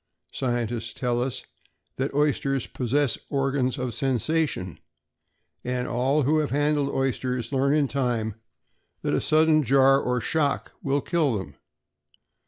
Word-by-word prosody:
Scientists 120 -3 -2
tell 120 -1 -1
us 130 0 -3 0.5
that 135 +2 -1
oysters 140 -3 +1
possess 130 +1 0
organs 135 -1 0
of 125 -2 -3
sensation, 135 - -1 0.8
and 125 0 -2
all 135 +5 +1
who 155 +4 +3
have 150 - 0
handled 145 0 +1
oysters 125 -3 -1
learn 140 +1 +2
in 145 -2 +2
time 120 -5 -1 0.7
that - - 0
a - - +1
sudden 155 0 +4
jar 135 +1 +4
or 125 0 0
shock 145 +2 0
will 140 +1 0
kill 150 -9 +1
them. 80 -7 -7
135 Hz, 130 wpm, -25 LUFS, 125-145 Hz, 0.8 s, sudden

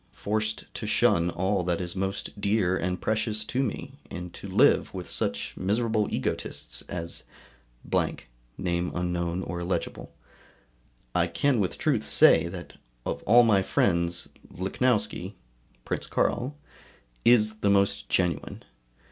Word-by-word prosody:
forced 105 +1 -1
to 105 - -5
shun 105 -6 +3
all 95 +3 0
that 90 +1 0
is 90 -1 -4
most 95 +2 -3
dear 100 -3 +2
and 90 -1 -1
precious 110 0 0
to 125 +4 -1
me, 130 -6 -4
and 90 0 -7
to - - -8
live - - +4
with - - -5
such 70 0 -2
miserable 110 +2 +1
egotists - - -3
as, 85 0 -5 0.6
&c. - - -2 2.3
I 85 -1 +3
can 125 +9 +1
with 95 -3 -1
truth - - +1
say 80 +1 +5
that 85 0 -8 0.3
of - - -3
all 120 +3 +8
my 105 -4 +4
friends 85 -2 +1 0.2
Lichnowsky 100 - 0 0.5
[Prince - - -3
Carl] 135 +4 0 0.7
is 110 -2 +5
the 100 - +1
most 100 0 +2
genuine. 90 -2 0
100 Hz, 120 wpm, -27 LUFS, 85-110 Hz, 2.3 s, all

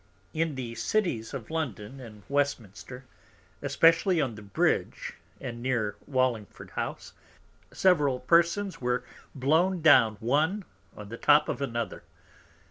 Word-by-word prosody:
In 160 -2 -1
the 125 -3 -5
Cities 130 - -1
of 130 -3 -7
London 135 -6 -4
and 110 -5 -12
Westminster, 130 -3 -3 0.6
especially 165 +2 +3
on 135 -6 0
the 105 - -10
Bridge 100 -1 -1 0.3
and 120 -3 -6
near 120 -5 -1
Wallingford 130 -6 -1
house, - - -5 0.6
several 150 -9 +3
Persons 170 +6 +2
were 125 0 0 0.3
blown 160 +6 +2
down 125 -8 +6
one 155 - 0 0.3
on 105 -1 -9
the 115 - -7
Top 150 +3 +4
of - - -3
another. 115 -4 -3
130 Hz, 125 wpm, -28 LUFS, 115-160 Hz, 0.6 s, down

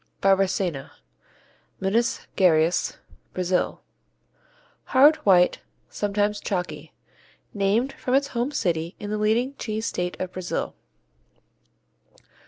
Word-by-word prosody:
Barbacena 190 -6 +1 0.9
Minas 220 +5 +1
Geraes, 170 -1 +3 0.4
Brazil 180 0 -1 1.0
Hard, 290 +4 +6
white, 180 -7 +4 0.3
sometimes 205 0 0
chalky. 160 -5 -4 0.6
Named 210 +7 +1
from 255 - -1
its 280 +1 +2
home 240 +1 -1
city 170 - -1
in 205 0 -5
the 215 - -1
leading 230 +5 +1
cheese 220 -1 -3
state 180 0 -3
of 185 -1 -4
Brazil. 185 -1 -3
195 Hz, 95 wpm, -24 LUFS, 180-220 Hz, 1.0 s, Hard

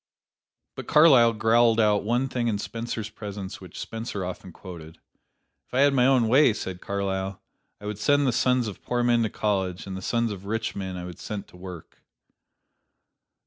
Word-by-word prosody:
But - - -8
Carlyle 135 -7 +6
growled 115 +1 +3
out 105 -2 +3
one 120 +5 +1
thing 120 -2 -2
in 110 -3 0
Spencer's 115 0 -5
presence 100 -3 -7
which - - -10
Spencer 110 -4 -5
often 90 0 -7
quoted. 80 -3 -11 0.7
"If - - -9
I 130 - +4
had 140 0 +5
my 125 -1 +4
own 130 -4 +4
way," 130 +1 +5
said 95 -3 -6
Carlyle, 95 -1 -3 0.4
"I 105 - -11
would 105 -1 -4
send 145 +6 +3
the 130 - +3
sons 125 0 +2
of 100 - -7
poor 120 0 -1
men 120 -1 +3
to 110 - +1
college, 95 -4 -1
and 95 -1 -6
the 95 - -6
sons 115 +3 0
of 100 -1 -8
rich 110 +2 -2
men 95 -2 -4
I 90 - -6
would 90 -2 -9
set 105 -2 -6
to - - -18
work." 90 -2 -10
110 Hz, 185 wpm, -26 LUFS, 95-120 Hz, 0.7 s, Carlyle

